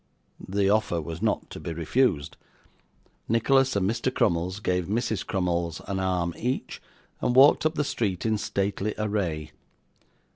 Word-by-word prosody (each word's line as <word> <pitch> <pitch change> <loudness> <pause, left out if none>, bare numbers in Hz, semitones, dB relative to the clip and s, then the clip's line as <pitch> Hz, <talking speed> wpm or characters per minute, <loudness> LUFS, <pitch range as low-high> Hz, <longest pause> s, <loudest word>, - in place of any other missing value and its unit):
The 100 +1 +1
offer 100 -4 +2
was 80 +1 -6
not - - -1
to - - -7
be 85 - -5
refused; 85 - 0 0.9
Nicholas 135 +3 +3
and 95 -2 +1
Mr. 115 +4 0
Crummles 90 -3 0
gave 90 -4 -1
Mrs 110 -1 -1
Crummles 85 -3 -1
an 95 -1 -2
arm 90 -2 0
each, 125 +3 -3 0.4
and 125 0 +1
walked 145 +4 +7
up 155 - -5
the 150 - +1
street 105 -9 -2
in 110 -1 +1
stately 100 0 -2
array. 90 -8 -2
100 Hz, 145 wpm, -26 LUFS, 85-115 Hz, 0.9 s, walked